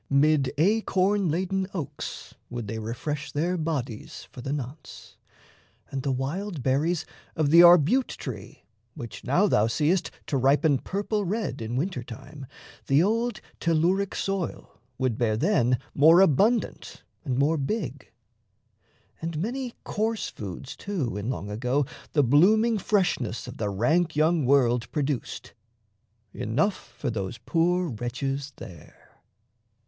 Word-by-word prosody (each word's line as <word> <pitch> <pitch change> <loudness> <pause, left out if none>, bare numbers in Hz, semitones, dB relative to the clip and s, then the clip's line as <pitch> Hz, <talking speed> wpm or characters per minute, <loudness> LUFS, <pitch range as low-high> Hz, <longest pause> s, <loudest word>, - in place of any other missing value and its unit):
Mid 140 -1 +3
acorn 200 +1 +2
laden 190 +4 -1
oaks 160 -6 -6 0.2
Would 120 -3 -5
they 110 +2 -4
refresh 140 +7 -4
their 170 +5 0
bodies 130 -9 -4
for 125 - -9
the 135 - -4
nonce; 145 +1 -7 0.8
And 135 - -3
the 135 - -1
wild 150 +5 -3
berries 150 +6 +1 0.3
of 150 -2 +1
the 170 - +8
arbute 175 - +6
tree, 110 -7 -8 0.3
Which 120 -7 -8
now 160 +10 +3
thou 110 - +3
seest 155 +9 +1 0.2
to 140 - -1
ripen 140 +2 +3
purple 205 - -2
red 195 - -2
In 115 +2 -4
winter 140 0 -1
time, 135 +3 -10 0.4
the 140 +4 +4
old 230 +3 0 0.2
telluric 175 +4 +1
soil 195 -3 -4 0.2
Would 130 -4 -1
bear 110 -3 +1
then 125 - +2 0.2
more 160 +5 +7
abundant 200 - +1 0.2
and 130 -5 -2
more 150 +4 +2
big. 210 +12 -3 1.1
And 165 -1 -3
many 245 - -3
coarse 220 +1 -1
foods, 100 +6 -7
too, 175 - -3
in 105 +3 -3
long 105 -5 -4
ago 125 +6 0 0.3
The 145 - +4
blooming 210 - +4
freshness 175 - 0
of - - -8
the 105 -2 -1
rank 155 - +1
young 155 -2 +2
world 125 -4 +3
Produced, 145 -4 -3 0.8
enough 145 - -1
for - - -2
those 100 0 -4
poor 170 +9 +1
wretches 135 +4 -3
there. 85 -4 -14
150 Hz, 135 wpm, -26 LUFS, 125-185 Hz, 1.1 s, the